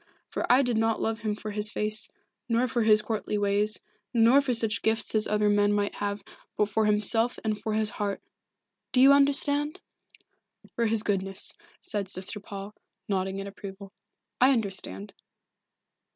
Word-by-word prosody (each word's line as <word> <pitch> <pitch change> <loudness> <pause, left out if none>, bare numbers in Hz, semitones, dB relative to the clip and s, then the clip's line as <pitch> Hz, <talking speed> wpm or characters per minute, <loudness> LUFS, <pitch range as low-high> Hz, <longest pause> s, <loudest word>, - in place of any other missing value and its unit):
For - - -1
I 260 +3 +5
did 245 -3 0
not 225 0 +1
love 225 0 -2
him 210 -1 -2
for 215 0 -7
his 210 +1 -1
face, 215 0 -3 0.4
nor 235 +2 +2
for 240 0 -1
his 215 -1 +4
courtly 215 -1 -3
ways, 205 0 0 0.4
nor 235 +4 +5
for 275 -2 -2
such 225 -2 0
gifts 220 0 -1
as 215 -1 +1
other 210 0 +1
men 205 0 +3
might 205 0 -1
have, 205 -1 -4 0.3
but 210 - +1
for 215 +1 +1
himself 220 +3 +5
and 215 -1 -2
for 220 0 -3
his 215 0 +2
heart 205 -2 -3 0.7
do 255 - +3
you 270 +2 +8
understand?" 285 +3 +2 1.0
"For 235 -1 +1
his 220 -1 +1
goodness," 195 -2 -1 0.3
said 205 -3 -4
Sister 190 +3 -1
Paul, 200 0 -9 0.3
nodding 190 -1 -2
in 195 - -5
approval. 195 0 -10 0.5
"I 260 +2 +6
understand." 190 - -3
215 Hz, 165 wpm, -27 LUFS, 205-230 Hz, 1.0 s, you